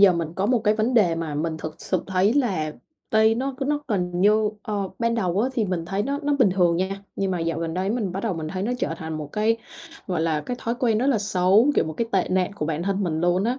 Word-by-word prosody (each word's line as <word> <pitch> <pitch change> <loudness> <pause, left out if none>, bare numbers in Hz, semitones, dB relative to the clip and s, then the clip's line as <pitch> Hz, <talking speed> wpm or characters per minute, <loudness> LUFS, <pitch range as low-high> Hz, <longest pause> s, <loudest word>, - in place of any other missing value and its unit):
giờ 200 -2 +8
mình 170 -2 -2
có 190 +3 0
một 245 +1 +3
cái 210 +1 +4
vấn 225 +4 0
đề 190 -8 +4
mà 165 -3 -4
mình 160 +2 -2
thực 155 -1 -7
sự 185 -2 -1
thấy 190 +3 +2
là 190 - 0 0.4
tay 220 0 +4
nó 265 +3 -2
nó 295 0 0
cần 180 -6 -1
như, 210 +2 +4
ờ, 200 -2 -2
ban 230 0 +1
đầu 190 -4 0
á 245 - +2
thì 235 -4 0
mình 180 -4 -2
thấy 195 +4 -1
nó 280 +5 -2
nó 290 0 +1
bình 230 -8 +5
thường 175 -2 +3
nha, 195 +2 -2
nhưng 195 -1 0
mà 180 -2 -1
dạo 165 -1 -1
gần 165 -1 -3
đây 185 +2 -1
á 215 - 0
mình 210 -7 -2
bắt 195 +2 -4
đầu 220 -5 -1
mình 160 -2 -4
thấy 185 +3 -3
nó 230 +5 0
trở 165 - -1
thành 160 0 -5
một 150 - -5
cái, 220 +2 +2 0.5
gọi 180 -4 -1
là, 160 -2 +1
cái 245 +11 -4
thói 235 - -1
quen 235 -3 +1
rất 250 - +1
là 270 -5 +3
xấu, 200 +5 +4
kiểu, - - +3
một 160 - -4
cái 230 +9 -2
tệ 190 -2 +2
nạn 185 +1 +1
của 150 - -3
bản 160 +1 -2
thân 195 +2 -1
mình 160 -3 -1
luôn 175 +3 +2
á. 250 +3 0
195 Hz, 285 wpm, -24 LUFS, 170-225 Hz, 0.5 s, giờ